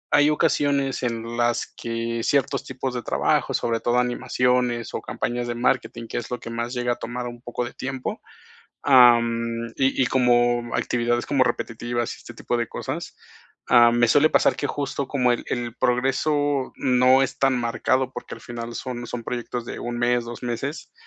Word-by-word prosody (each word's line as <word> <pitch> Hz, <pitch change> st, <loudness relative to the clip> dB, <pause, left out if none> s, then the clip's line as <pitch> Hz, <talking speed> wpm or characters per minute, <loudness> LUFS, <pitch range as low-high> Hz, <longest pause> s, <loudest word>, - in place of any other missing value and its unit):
hay 145 Hz, 0 st, +5 dB
ocasiones 145 Hz, -3 st, +1 dB
en 115 Hz, -1 st, -3 dB
las 120 Hz, 0 st, +1 dB
que 115 Hz, 0 st, -3 dB
ciertos 140 Hz, -2 st, +1 dB
tipos 130 Hz, 0 st, -4 dB
de 120 Hz, -, -3 dB
trabajos, -, -, +1 dB
sobre 115 Hz, -1 st, -1 dB
todo 120 Hz, +1 st, +1 dB
animaciones 125 Hz, -1 st, 0 dB
o -, -, -3 dB
campañas 120 Hz, 0 st, -3 dB
de 120 Hz, -, -3 dB
marketing, 120 Hz, -1 st, 0 dB
que -, -, -5 dB
es 120 Hz, -, -4 dB
lo 125 Hz, -, -3 dB
que 115 Hz, -, -8 dB
más 115 Hz, +1 st, -3 dB
llega 120 Hz, 0 st, 0 dB
a -, -, -6 dB
tomar 120 Hz, +1 st, -5 dB
un 120 Hz, -1 st, -8 dB
poco 120 Hz, 0 st, -4 dB
de 120 Hz, -, -8 dB
tiempo, 130 Hz, -1 st, -5 dB, 0.6 s
am, 115 Hz, -3 st, +4 dB
y 135 Hz, 0 st, +2 dB
y -, -, +2 dB
como 120 Hz, -1 st, +2 dB
actividades 120 Hz, 0 st, 0 dB
como 135 Hz, -3 st, +3 dB
repetitivas 120 Hz, 0 st, -2 dB
y -, -, -14 dB
este -, -, -12 dB
tipo 120 Hz, -, -2 dB
de 120 Hz, -1 st, -1 dB
cosas, -, -, -5 dB, 0.5 s
am, 120 Hz, -1 st, +6 dB
me 120 Hz, -1 st, +4 dB
suele 145 Hz, +5 st, +5 dB
pasar -, -, +3 dB
que, 145 Hz, -, -2 dB
justo, 140 Hz, -1 st, -3 dB
como 125 Hz, -3 st, +2 dB
el 120 Hz, -, -3 dB
el 120 Hz, -1 st, -3 dB
progreso 135 Hz, +2 st, +1 dB
no 130 Hz, +1 st, +4 dB
es 135 Hz, -, -2 dB
tan 135 Hz, -1 st, +3 dB
marcado, 125 Hz, +2 st, 0 dB
porque, -, -, -7 dB
al -, -, -13 dB
final, 120 Hz, -1 st, -7 dB
son 120 Hz, 0 st, -5 dB
son 120 Hz, 0 st, -5 dB
proyectos 120 Hz, 0 st, -4 dB
de -, -, -6 dB
un 120 Hz, 0 st, -4 dB
mes, 120 Hz, 0 st, +2 dB
dos 120 Hz, 0 st, -8 dB
meses, 125 Hz, +5 st, -4 dB
120 Hz, 185 wpm, -24 LUFS, 120-130 Hz, 0.6 s, am